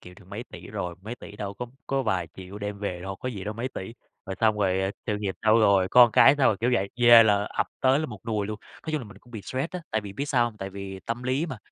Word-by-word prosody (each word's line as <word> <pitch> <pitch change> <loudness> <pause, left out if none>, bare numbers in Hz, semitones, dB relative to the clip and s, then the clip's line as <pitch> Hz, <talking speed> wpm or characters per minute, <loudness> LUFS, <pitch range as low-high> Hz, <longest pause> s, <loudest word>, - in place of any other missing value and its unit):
kiệm 90 0 -13
được 100 - -17
mấy 105 +4 -6
tỷ - - -10
rồi?" 95 -4 -4
Mấy 110 +4 -6
tỷ 105 -3 -12
đâu 100 -1 -5
có 125 +4 -5 0.2
có 135 0 0
vài 95 -8 -1
triệu 95 +2 -9
đem 105 0 -5
về 95 -4 -4
đâu 95 +2 -5
có 130 - -5
gì 100 -6 -6
đâu 105 +1 -4
mấy 120 +4 -3
tỷ, 115 -3 -7 0.3
rồi 95 - -5
xong 110 -1 +3
rồi 95 -1 +1 0.2
"Sự 105 - 0
nghiệp 100 -2 -3
sao 110 +1 +5
rồi? 100 -4 +4
Con 120 -2 +7
cái 135 - +7
sao 135 - +4
rồi?", 100 - +2
kiểu 120 +2 +2
vậy, 100 -3 0
về 120 -1 +9
là 105 -2 +3
ập - - -1
tới 130 +1 +4
là 155 - -1
một 105 -5 -9
nùi 105 -3 -1
luôn. 105 0 -5 0.2
Nói 160 - -5
chung 155 - 0
là - - -8
mình 105 -2 -13
cũng 120 - -21
bị 110 -4 -7
stress 130 +5 -3
á, 180 - -5
tại 110 - 0
vì 100 -2 -8
biết 135 +8 -3
sao 125 -3 +3
hông? 115 -2 -4
Tại 95 0 -5
vì 95 0 -7
tâm 115 +1 -3
lý 130 +6 0
mà, 130 -7 -5
105 Hz, 300 wpm, -26 LUFS, 100-120 Hz, 0.3 s, về